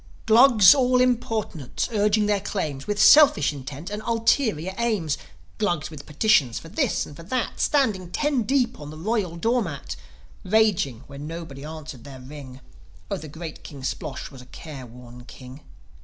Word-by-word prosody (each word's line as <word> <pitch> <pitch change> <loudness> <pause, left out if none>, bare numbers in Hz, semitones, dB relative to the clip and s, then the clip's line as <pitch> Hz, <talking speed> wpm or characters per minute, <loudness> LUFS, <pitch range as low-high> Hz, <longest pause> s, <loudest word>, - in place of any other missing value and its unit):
Glus 225 -4 +7
all 255 -2 +2
importunate 225 - -1
urging 210 0 +2
their 205 -1 +1
claims, 155 -9 -4
With 205 0 -2
selfish 215 - +6
intent 140 +6 -8
and 210 +1 -4
ulterior 225 - +1
aims, 210 -11 0 0.4
Glugs 175 -8 -1
with 150 -2 -10
petitions 150 - +2
for 165 - -9
this - - 0
and 145 - -12
for 165 - -11
that, 235 +8 -3
Standing 215 - +1
ten 285 +6 0
deep 250 +1 0
on 145 - -8
the 155 - -9
royal 195 -1 -1
door 230 +8 +1
mat, 155 -9 -5 0.5
Raging 185 - +1
when 140 +1 -9
nobody 160 -4 -8
answered 155 -5 -9
their 135 -1 -10
ring 130 0 -11 0.5
Oh, - - 0
the 155 - -9
great 160 +1 -8
King 140 -3 -10
Splosh 140 -1 -5
was 135 -2 -12
a 125 - -16
careworn 125 -5 -11
king. 130 +3 -12
170 Hz, 160 wpm, -24 LUFS, 140-220 Hz, 0.5 s, Glus